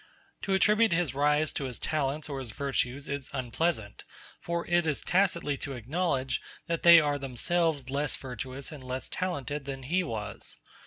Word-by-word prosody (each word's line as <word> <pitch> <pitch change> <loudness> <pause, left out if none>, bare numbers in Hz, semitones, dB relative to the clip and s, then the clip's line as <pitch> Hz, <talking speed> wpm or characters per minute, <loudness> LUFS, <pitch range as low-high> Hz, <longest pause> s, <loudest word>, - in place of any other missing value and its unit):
To 195 - +1
attribute 210 +2 +4
his 165 -6 +1
rise 150 +2 +2
to 140 - -2
his 125 -3 -4
talents 150 0 -1
or 140 -2 -4
his 130 -3 -5
virtues 135 +2 -1
is 140 -1 -4
unpleasant; 130 -3 -1 0.4
for 170 0 -2
it 175 -1 +2
is 150 - 0
tacitly 170 -6 +2
to 140 - -4
acknowledge 130 0 -1 0.2
that 170 -1 -1
they 170 -1 +10
are 145 -2 +1
themselves 140 +1 0
less 145 +1 0
virtuous 130 +2 -6
and 145 -4 -9
less 130 +1 -4
talented 145 -6 -3
than 135 -1 -5
he 175 +8 +1
was. 110 -9 -5
145 Hz, 165 wpm, -29 LUFS, 130-170 Hz, 0.4 s, they